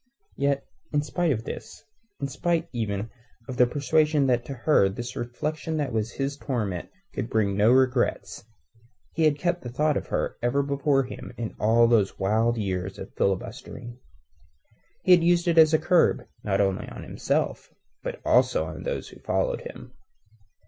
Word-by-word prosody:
Yet, 140 0 0 0.3
in 145 -1 +1
spite 175 +2 0
of 115 -4 -1
this, - - -8 0.4
in 140 - -2
spite 170 +4 -1
even 105 -2 -3 0.4
of 130 - -6
the 125 - +5
persuasion 150 +2 +2
that 120 -2 +2
to 140 - -6
her 120 -6 +3
this 120 +5 -6
reflection 155 +6 -3
that 145 -5 -2
was 110 +1 -1
his 140 +1 -2
torment 105 -11 -3 0.2
could 115 - -3
bring 100 -3 +1
no 105 +3 +4
regrets, 130 -1 +1 0.7
he 160 - +2
had 150 -2 +3
kept 175 +3 -1
the 120 - -6
thought 150 +4 +1
of - - -5
her - - -2
ever 125 +4 +1
before 140 0 +1
him 125 - -8
in 115 -2 -4
all 115 +2 +5
those 110 -4 +2
wild 110 +4 +1
years 95 -3 -3
of - - -9
filibustering. 120 +5 -3 1.0
He 185 - +3
had 175 -2 +7
used 175 +1 +3
it 165 -1 +4
as 155 -1 +7
a 155 - +5
curb 155 -6 +3 0.2
not 95 -2 0
only 95 -2 0
upon - - -8
himself, - - -2 0.3
but - - -5
also - - +3
upon 80 -1 -7
those - - -4
who - - -14
followed - - -1
him. - - -10
125 Hz, 170 wpm, -26 LUFS, 110-150 Hz, 1.0 s, had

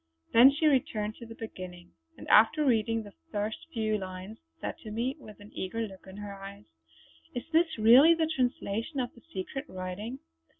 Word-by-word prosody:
Then 240 +4 +9
she 290 +3 -1
returned 220 -7 +2
to 235 - -10
the 225 - -10
beginning, 180 -5 -9 0.3
and - - -10
after 305 -1 +6
reading 225 -2 +2
the 205 -1 -12 0.2
first 210 +5 -3
few 215 -5 0
lines, 185 +3 -7 0.2
said - - -5
to 220 - -9
me 235 +5 -2
with 215 -6 -13
an 205 +1 -13
eager 190 +5 -3
look 195 -3 -9
in 190 +1 -10
her 205 -1 -6
eyes: 195 0 -10 0.7
"Is 245 - -3
this 325 -2 +2
really 250 +10 +8
the 325 -1 +1
translation 255 -3 -1
of 245 -1 -2
the 235 - -17
secret 330 -7 -5
writing? 185 +7 -5
225 Hz, 180 wpm, -29 LUFS, 200-260 Hz, 0.7 s, Then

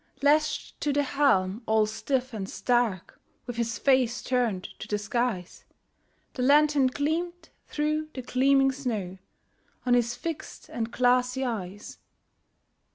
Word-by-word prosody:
Lashed 305 +1 +1
to 295 - +1
the 290 +1 +2
helm, 230 -8 +2
all 220 0 +4
stiff 255 +4 -2
and 200 -3 -4
stark, 240 -7 -1 0.2
With 245 -1 -6
his 230 -1 -1
face 260 -3 +2
turned 235 -7 0 0.2
to - - -7
the 210 - 0
skies, 215 -3 -2 0.7
The 255 - -4
lantern 290 0 +5
gleamed 325 +6 -2 0.2
through 305 +1 -1
the 255 - -5
gleaming 270 +2 +3
snow 215 -9 -4 0.7
On 250 - +3
his 240 0 +2
fixed 330 +1 -6
and 230 -1 -3
glassy 250 +1 +2
eyes. 205 -4 -5
250 Hz, 130 wpm, -27 LUFS, 220-280 Hz, 0.7 s, lantern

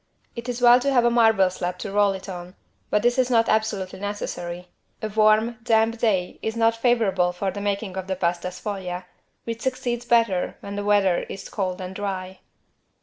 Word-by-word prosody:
It 235 +1 -6
is 245 0 -3
well 240 +1 +8
to 275 +2 0
have 245 -3 +4
a 240 - +4
marble 225 -5 +4
slab 180 0 -4
to 200 +2 -6
roll 205 0 +3
it 190 +1 -8
on 180 0 -8 0.3
but 210 - +1
this 245 +2 +2
is 255 -1 +2
not 230 -2 +3
absolutely 210 -4 -1
necessary. 180 -3 -5 0.3
A 215 - -3
warm, 215 +2 +3
damp 225 0 +2
day 195 -6 0
is 220 0 -3
not 230 0 +3
favorable 220 -7 +2
for 190 +2 -2
the 200 - -6
making 200 -1 -2
of 190 -1 -5
the 190 - -1
=Pasta 175 -1 -1
sfoglia=, 185 -1 -5 0.4
which 230 0 -5
succeeds 250 -2 -2
better 230 -6 +2
when 200 0 -7
the 205 - -3
weather 200 -3 +3
is 195 - -7
cold 185 -3 -3
and 185 0 -6
dry. 190 -2 -5
205 Hz, 195 wpm, -24 LUFS, 185-230 Hz, 0.4 s, well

